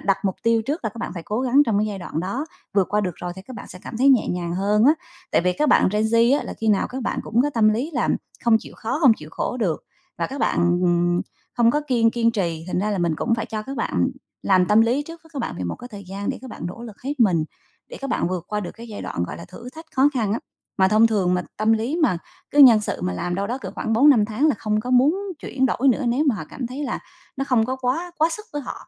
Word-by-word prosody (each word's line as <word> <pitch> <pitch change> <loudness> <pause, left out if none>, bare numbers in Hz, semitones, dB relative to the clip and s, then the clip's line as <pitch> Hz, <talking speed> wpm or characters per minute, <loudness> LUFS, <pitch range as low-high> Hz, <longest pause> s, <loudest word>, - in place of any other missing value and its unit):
đặt 195 -1 +1
mục 190 - +1
tiêu 230 -1 +3
trước 285 +4 -3
là 220 - 0
các 225 - -19
bạn - - -3
phải 170 - -6
cố 215 +7 -2
gắng 265 +3 +4
trong 210 -1 +1
cái 205 -2 -4
đoạn 170 -3 -4
đó, 200 - -3 0.3
vượt 195 -3 +3
qua 210 - +2
được 180 -4 -2
rồi 175 0 -5
thì 190 - -9
các 255 +3 -10
bạn - - -9
sẽ 180 - -10
cảm - - -7
thấy 260 +4 +4
nhẹ 260 -4 +4
nhàng 175 -1 -2
hơn 205 +4 +2
á. 290 - +7 0.4
Tại - - +3
vì 180 +1 +2
các 300 +10 0
bạn - - +5
gen 210 +1 +1
Z 230 +5 +4
á - - -5
là - - -6
khi 225 - 0
nào 205 -2 +3
các 260 +1 -5
bạn - - -2
cũng 230 +3 +1
có 290 - 0
tâm 220 -2 +4
lý 235 +9 0
là - - +1 0.4
không 235 -2 +6
chịu - - -12
khó, 240 +5 -2
không 265 -8 +7
chịu 150 - -11
khổ - - -2
được 190 -10 -1 0.3
và - - 0
các 275 - -7
bạn, - - +1 0.2
ừm, 175 0 +2 0.3
không 235 -1 +4
có 295 - +1
kiên 235 -4 +3
kiên 230 0 +2
trì 170 -7 -2
thành 180 - -2
ra 210 +3 0
là 200 - -1
mình 170 -2 +1
cũng 230 +8 +1
phải 230 - -3
cho 215 -1 -4
các 270 +4 -7
bạn - - 0 0.3
làm 185 -2 +3
tâm 210 +3 +5
lý 240 +5 +2
trước 330 +2 -11
với 325 - -20
các 290 - -5
bạn 235 - -3
về 90 - -3
một 85 - -3
cái 245 - -10
thời 205 -4 -10
gian 200 +1 -4
để - - -5
các 260 - -10
bạn - - -9
nỗ 190 +7 -7
lực 225 -4 -9
hết 280 +1 -4
mình, 175 -8 +4 0.4
để - - -9
các 275 - -4
bạn - - 0
vượt 180 -2 -3
qua 210 0 -1
được 180 - -5
cái 235 +1 -11
giai 210 - -7
đoạn 85 - -3
gọi - - -7
là 170 - -9
thử 190 +7 -11
thách 320 +1 -10
khó 265 +2 +6
khăn 220 -5 0
á. 225 - 0 0.4
Mà 190 0 +5
thông 215 +2 +5
thường 195 -5 +1
mà 180 - 0
tâm 215 +1 +2
lý 230 +8 0
mà 185 - +3 0.3
cứ 290 - -2
nhân 245 -6 +9
sự 210 - -4
mà 90 - -1
làm 135 - -3
ở - - 0
đâu 200 +2 -1
đó 245 +5 -3
cỡ 195 -8 -7
khoảng 225 - -2
4-5 245 -2 +6
tháng 225 +8 0
là 295 - +3
không 215 0 0
có 250 - -5
muốn 260 +7 +4 0.2
chuyển 265 -3 0
đổi 265 +2 +1
nữa 260 +1 +2
nếu 260 +6 +1
mà 260 - +3
họ 185 - -5
cảm 255 - -5
thấy 265 +5 -5
là 270 - -2 0.4
nó 270 - -1
không 250 -5 +2
có 260 +1 -2
quá 265 +8 -2
quá 315 +1 +4
sức 425 - -11
với 290 -1 -3
họ, - - -6
225 Hz, 300 wpm, -23 LUFS, 195-260 Hz, 0.4 s, nhân